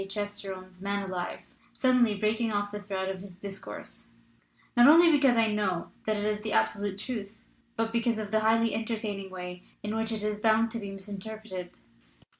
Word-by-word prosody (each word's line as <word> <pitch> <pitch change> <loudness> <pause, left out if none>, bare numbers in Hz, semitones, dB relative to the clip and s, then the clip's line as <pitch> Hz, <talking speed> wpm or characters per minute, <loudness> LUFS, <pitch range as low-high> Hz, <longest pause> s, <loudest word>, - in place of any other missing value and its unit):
Chesterton's 195 -3 -5
Man 200 0 -1
alive), 180 -2 -4 0.3
suddenly 250 -4 +4
breaking 220 +3 +1
off 205 0 -1
the 210 0 -5
thread 190 -2 -3
of 190 -1 -3
his 190 -2 -11
discourse, 200 0 -8 0.7
"not 240 +1 +8
only 330 +3 +8
because 275 -5 +5
I 225 -1 +4
know 190 -5 -1 0.2
that 215 -1 +2
it 205 - -2
is 210 0 0
the 215 0 -3
absolute 190 - +1
truth, 215 -2 -5 0.4
but 225 -1 -1
because 235 -1 +1
of 210 -2 -4
the 220 - +4
highly 225 +1 +3
enter 225 +1 -1
taining 205 -3 -4
way 180 -1 -7 0.2
in 210 +1 -2
which 225 0 0
it 215 -2 -2
is 210 0 -1
bound 220 +1 +3
to 230 - -3
be 200 -2 -6
misin 195 +1 -6
terpreted. 200 -4 -6
210 Hz, 190 wpm, -29 LUFS, 195-225 Hz, 0.7 s, not